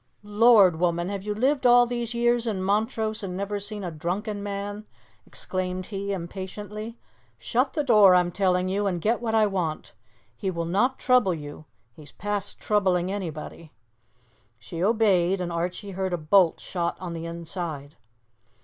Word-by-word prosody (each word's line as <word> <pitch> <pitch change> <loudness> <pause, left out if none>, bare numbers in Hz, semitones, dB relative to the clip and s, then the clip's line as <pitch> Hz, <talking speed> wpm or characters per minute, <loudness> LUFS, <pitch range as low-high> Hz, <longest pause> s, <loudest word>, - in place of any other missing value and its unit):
"Lord! 205 -5 +5
woman, 175 0 0
have 200 -1 -4
you 210 +1 -3
lived 260 +3 +2
all 245 0 +7
these 240 -1 -3
years 240 0 +2
in 195 -4 -2
Montrose 220 +2 0
and 185 -2 -5
never 200 +1 -3
seen 205 0 -5
a 175 - -4
drunken 200 +7 -3
man?" 205 +1 -5 0.4
exclaimed 185 0 -4
he 200 0 -4
impatiently. 205 +5 -6 0.4
"Shut 245 - 0
the 300 - 0
door, 210 -8 +6
I'm 180 -1 +3
telling 180 0 +1
you, 200 +2 0
and 180 -3 -1
get 225 +7 0
what 225 -2 -1
I 220 -1 +5
want. 180 -6 -3 0.4
He 195 - -3
will 170 -2 -3
not 220 +10 +1
trouble 245 -8 +3
you. 145 0 -9 0.3
He's 150 +3 -13
past 205 -1 -4
troubling 190 -3 +1
anybody." 165 -4 -6 0.8
She 120 +10 -6
obeyed, 195 -4 +3
and 175 -1 -3
Archie 180 +4 -3
heard 190 -1 -2
a - - +1
bolt 165 +2 +3
shot 170 -2 -3
on 180 -2 -5
the 165 0 -5
inside. 165 -3 -6
195 Hz, 160 wpm, -25 LUFS, 175-215 Hz, 0.8 s, all